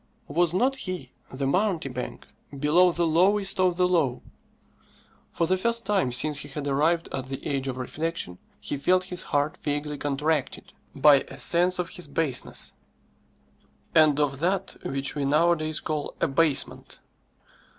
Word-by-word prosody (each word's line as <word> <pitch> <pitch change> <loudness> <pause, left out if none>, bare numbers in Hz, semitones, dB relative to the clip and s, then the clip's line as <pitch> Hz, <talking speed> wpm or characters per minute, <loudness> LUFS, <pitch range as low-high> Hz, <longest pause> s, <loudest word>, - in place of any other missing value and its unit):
Was 175 -1 +2
not 250 +9 +1
he, 185 -7 -5 0.2
the 135 +1 -3
mountebank, 155 - -2 0.3
below 165 +6 +4
the 170 0 0
lowest 190 +5 +2
of 180 -2 +2
the 180 -1 +3
low? 155 -9 +1 1.1
For 170 - 0
the 185 +2 +1
first 235 +2 0
time 195 -10 +1
since 145 +4 +1
he 145 - -5
had 145 0 -6
arrived 160 +5 +1
at 130 -1 -4
the 135 0 -7
age 135 -1 -2
of 130 -1 -3
reflection, 145 - -4 0.2
he 145 - -4
felt 185 +6 +2
his 180 0 -3
heart 145 +1 -1
vaguely 145 0 -3
contracted 145 0 -2 0.2
by 150 -2 +7
a 135 - -10
sense 175 +8 +3
of 180 -1 -2
his 180 - -8
baseness, 145 -1 -2 1.2
and 155 -2 +5
of 140 -2 0
that 190 +4 -1
which 135 0 -1
we 145 - -2
nowadays 155 +2 +2
call 155 -2 -4
abasement. 145 0 0
155 Hz, 150 wpm, -26 LUFS, 140-180 Hz, 1.2 s, by